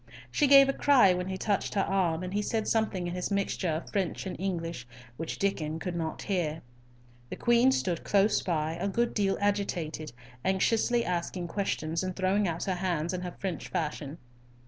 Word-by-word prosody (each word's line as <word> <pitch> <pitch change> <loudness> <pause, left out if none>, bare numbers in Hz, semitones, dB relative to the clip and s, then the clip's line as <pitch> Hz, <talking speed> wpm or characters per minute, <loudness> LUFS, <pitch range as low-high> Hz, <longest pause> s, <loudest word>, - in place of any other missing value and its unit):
She 290 - +3
gave 275 0 +8
a 275 - +1
cry 260 -12 +5
when 180 0 -3
he 190 0 -3
touched 200 +2 -1
her 195 - +3
arm, 180 -3 0
and 185 +1 -5
he 205 - +1
said 220 +1 -1
something 215 -5 0
in 175 - -3
his 180 0 -2
mixture 200 -2 -1
of 160 +1 -3
French 195 -3 -1
and 190 - -4
English, 165 -8 -3 0.3
which 160 +5 -5
Diccon 160 -6 -1
could 175 +1 -4
not 160 -2 -3
hear. 165 -6 -1 0.7
The - - -4
Queen 240 +2 +4
stood 180 -9 -1
close 205 +1 +3
by, 160 -3 -1
a - - 0
good 235 +4 0
deal 195 -2 +1
agitated, 180 -7 -1 0.3
anxiously 225 +5 +2
asking 175 0 -2
questions, 165 -4 -1
and 185 -1 -3
throwing 195 +2 +1
out 165 0 -2
her 190 - 0
hands 175 -2 -1
in 180 - -3
her 180 -1 -6
French 185 -6 -4
fashion. 150 -1 -3
185 Hz, 190 wpm, -29 LUFS, 165-200 Hz, 0.7 s, gave